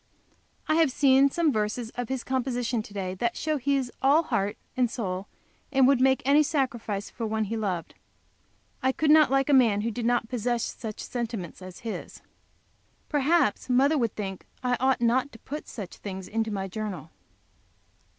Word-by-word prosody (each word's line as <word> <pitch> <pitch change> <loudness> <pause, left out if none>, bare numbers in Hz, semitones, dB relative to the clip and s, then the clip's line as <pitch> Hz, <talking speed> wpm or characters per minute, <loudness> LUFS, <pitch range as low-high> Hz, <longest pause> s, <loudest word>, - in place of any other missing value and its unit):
I 310 - +3
have 325 -3 +4
seen 270 +1 +5
some 320 0 +1
verses 215 +2 -2
of 245 -2 -5
his 265 -2 -2
composition 245 -3 -1
to 215 - -13
day 190 -2 -3
that 235 +5 -2
show 310 0 0
that 260 - -11
he 280 0 +3
is 260 -3 -1
all 285 +5 +5
heart 205 -7 -1 0.2
and 250 -2 +2
soul, 195 -5 -4 0.4
and 270 -2 +5
would 270 -2 +4
make 265 0 +3
any 285 +2 +6
sacrifice 245 -9 -1
for 230 - -4
one 220 0 0
he 215 +2 -3
loved. 190 -6 -3 0.9
I 260 0 +2
could 305 +1 +2
not 310 -1 +7
like 270 0 +2
a 290 - +3
man 230 -6 +5
who 230 +2 -1
did 230 +1 -2
not 240 -2 +1
possess 240 0 -1
such 220 -3 -5
sentiments 230 -9 -5
as 185 -1 -10
his. 225 -2 -6 0.9
Perhaps 290 -5 +2
mother 270 +5 +4
would 235 -7 0
think 195 -3 -5 0.2
I 250 0 +2
ought 260 0 +2
not 250 +4 +2
to - - -11
put 290 +6 -7
such 200 -6 -8
things 190 -2 -7
into 225 0 -1
my 195 -2 -3
journal. 185 -6 -5
240 Hz, 185 wpm, -27 LUFS, 210-270 Hz, 0.9 s, not